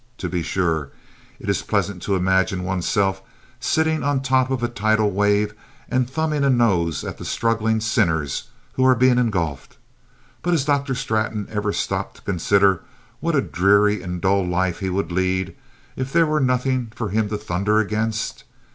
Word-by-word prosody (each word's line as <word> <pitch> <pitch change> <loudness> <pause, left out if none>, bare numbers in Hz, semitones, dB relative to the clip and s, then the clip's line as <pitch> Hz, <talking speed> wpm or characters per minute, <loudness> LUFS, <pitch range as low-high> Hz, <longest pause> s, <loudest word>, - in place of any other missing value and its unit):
To 90 - -4
be 90 0 -2
sure, 80 -4 -1 0.5
it - - -9
is - - +1
pleasant 95 -3 -1
to 100 - 0
imagine 95 0 +1
oneself 95 +1 0 0.4
sitting 160 +4 +1
on 140 0 0
top 130 -1 +2
of 130 -2 -2
a - - +2
tidal 110 -2 +1
wave 105 +1 +2 0.4
and 125 -1 +1
thumbing 155 0 -1
a 140 - +3
nose 95 - +2
at - - -6
the - - -7
struggling 110 -1 0
sinners 85 -10 0 0.3
who 130 - 0
are 130 0 +6
being 125 +1 +4
engulfed. 90 - -2 0.6
But 175 - 0
has 150 -5 +1
Dr. 140 -2 +1
Straton 110 -4 -1
ever 105 -1 -1
stopped - - -2
to - - -17
consider 100 0 +2 0.4
what - - 0
a - - +4
dreary 100 +2 +3
and 90 -1 -5
dull 100 +1 +2
life 90 0 -1
he 95 -2 -2
would 90 -2 -2
lead 95 +1 -1 0.4
if 130 +1 -4
there 170 +1 +4
were 155 0 +1
nothing 125 -2 0
for 110 -3 -3
him 105 +1 0
to 105 - -2
thunder 105 +1 0
against? 110 +1 -1
105 Hz, 175 wpm, -22 LUFS, 95-125 Hz, 0.6 s, are